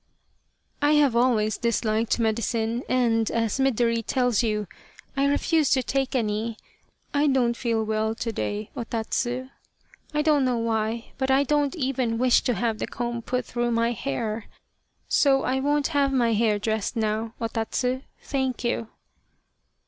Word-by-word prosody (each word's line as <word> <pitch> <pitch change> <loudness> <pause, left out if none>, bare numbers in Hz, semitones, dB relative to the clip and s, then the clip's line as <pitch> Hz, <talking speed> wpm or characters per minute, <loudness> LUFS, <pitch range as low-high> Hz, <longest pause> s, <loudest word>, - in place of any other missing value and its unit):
" - - -46 0.3
I 295 +1 +4
have 290 -5 +4
always 225 -4 +2
disliked 225 -1 +1
medicine 230 +1 0
and, 230 -3 +2
as 230 +2 -1
Midori 235 -3 +2
tells 245 -2 +1
you, 210 -3 0 0.5
I 275 +1 +2
refused 300 +1 +2
to 260 - +2
take 270 +1 -1
any. 220 -1 -1 0.6
I 290 +1 +3
don't 250 -4 +2
feel 230 -2 0
well 220 0 -1
to 230 0 -3
day, 210 0 -3
O - - -3
Tatsu. 240 +3 -2 0.6
I 300 -1 0
don't 300 -3 +3
know 250 -2 +1
why, 225 0 -1
but 265 0 0
I 265 +1 +4
don't 290 +2 +1
even 255 -6 -1
wish 250 0 +4
to 245 - +1
have 220 +2 -1
the - - -2
comb 240 -1 -3
put 250 +1 -2
through 240 0 -1
my 230 +1 +2
hair 215 - -3 0.6
so 275 -2 +3
I 260 +1 0
won't 290 +1 +1
have 285 -3 +2
my 240 -4 +2
hair 215 -1 +2
dressed 220 +2 -2
now, 220 +1 -1
O 230 - -1
Tatsu, 250 +3 -1 0.2
thank 265 -3 -2
you." 235 -1 -1
235 Hz, 160 wpm, -25 LUFS, 225-265 Hz, 0.6 s, I